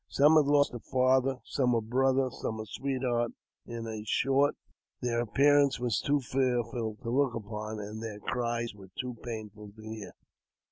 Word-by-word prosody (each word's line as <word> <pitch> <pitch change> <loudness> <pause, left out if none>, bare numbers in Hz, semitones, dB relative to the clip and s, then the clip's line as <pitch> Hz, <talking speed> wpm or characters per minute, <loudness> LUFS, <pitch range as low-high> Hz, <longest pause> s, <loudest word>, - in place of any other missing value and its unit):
Some 150 +3 +5
had 155 -2 +6
lost 145 -2 +4
a 120 - -5
father, 130 +2 +2
some 125 -4 +1
a - - +3
brother, 130 +3 +2
some 110 -1 -4
a 110 - -4
sweetheart; 125 0 -1 0.3
in 115 -1 -5 0.2
short, 135 +6 +3 0.4
their 120 -2 0
appearance 140 +3 +4
was 120 -3 0
too 145 0 +1
fearful 120 -4 -1
to 115 - -3
look 135 -1 +2
upon, 105 0 -5
and 105 +1 -6
their 110 -2 -5
cries 120 0 -2
were 95 -2 -14
too 125 -2 -4
painful 105 -3 -7
to 110 - -13
hear. 110 -2 -7
120 Hz, 160 wpm, -30 LUFS, 110-135 Hz, 0.4 s, had